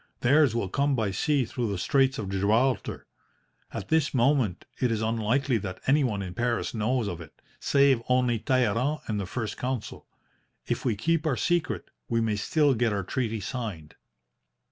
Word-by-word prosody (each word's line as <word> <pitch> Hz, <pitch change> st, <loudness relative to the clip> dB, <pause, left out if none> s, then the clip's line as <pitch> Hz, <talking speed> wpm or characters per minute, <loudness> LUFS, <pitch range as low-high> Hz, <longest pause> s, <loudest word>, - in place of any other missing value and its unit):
Theirs 140 Hz, -1 st, +4 dB
will 115 Hz, -5 st, 0 dB
come 140 Hz, +7 st, +1 dB
by 110 Hz, -5 st, 0 dB
sea 140 Hz, +7 st, +1 dB
through 115 Hz, 0 st, -3 dB
the 100 Hz, -, -2 dB
Straits 135 Hz, +6 st, +2 dB
of 105 Hz, -, -4 dB
Gibraltar. 110 Hz, +7 st, +1 dB, 0.7 s
At -, -, -6 dB
this 160 Hz, -3 st, +2 dB
moment 125 Hz, -, +2 dB
it 125 Hz, -2 st, +1 dB
is 110 Hz, -, 0 dB
unlikely 115 Hz, +3 st, +1 dB
that 95 Hz, -2 st, -6 dB
anyone 130 Hz, -8 st, +2 dB
in 90 Hz, -2 st, -6 dB
Paris 120 Hz, +3 st, -1 dB
knows 115 Hz, +1 st, 0 dB
of 85 Hz, -3 st, -5 dB
it, 80 Hz, -, -13 dB, 0.2 s
save 140 Hz, -3 st, +3 dB
only 125 Hz, -2 st, +2 dB
Talleyrand 130 Hz, +4 st, +1 dB
and 105 Hz, -2 st, -2 dB
the 95 Hz, -, -4 dB
First 110 Hz, +1 st, -4 dB
Consul. 125 Hz, -3 st, -4 dB, 0.6 s
If -, -, -2 dB
we 120 Hz, -5 st, +1 dB
keep 160 Hz, +9 st, 0 dB
our 135 Hz, -5 st, +1 dB
secret, 175 Hz, -1 st, -1 dB, 0.2 s
we 115 Hz, -1 st, +1 dB
may 110 Hz, -2 st, 0 dB
still 145 Hz, +7 st, +2 dB
get 120 Hz, -1 st, +1 dB
our 100 Hz, -2 st, -1 dB
treaty 115 Hz, +1 st, -2 dB
signed.' 100 Hz, -9 st, -5 dB
120 Hz, 170 wpm, -27 LUFS, 105-135 Hz, 0.7 s, Theirs